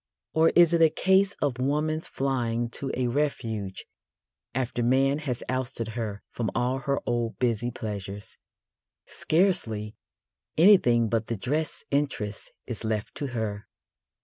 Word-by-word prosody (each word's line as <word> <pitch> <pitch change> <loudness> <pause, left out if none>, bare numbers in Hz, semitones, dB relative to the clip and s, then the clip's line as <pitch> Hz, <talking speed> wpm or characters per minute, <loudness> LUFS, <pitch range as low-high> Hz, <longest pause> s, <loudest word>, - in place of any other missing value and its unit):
Or 160 +1 +5
is 170 -1 +6
it 170 - +3
a 160 - +7
case 190 +4 +3
of 130 -4 0
woman's 150 +4 0
flying 120 -3 -1
to 135 +3 -3
a 125 - 0
refuge 115 -7 -2 0.7
after 125 -1 -1
man 135 +4 +3
has 130 -6 -3
ousted 130 -3 -2
her 110 -3 -4
from 115 -4 -2
all 125 +2 +1
her 140 0 0
old 120 -1 -1
busy 120 -1 0
pleasures? 100 -3 -6 0.7
Scarcely 115 - 0 0.6
anything 150 - +6
but 110 0 0
the 115 - -2
dress 150 +9 -2
interest 140 -8 -2
is 120 -2 -6
left 110 -1 -2
to 145 - -4
her. 110 -4 -3
125 Hz, 135 wpm, -27 LUFS, 115-145 Hz, 0.7 s, a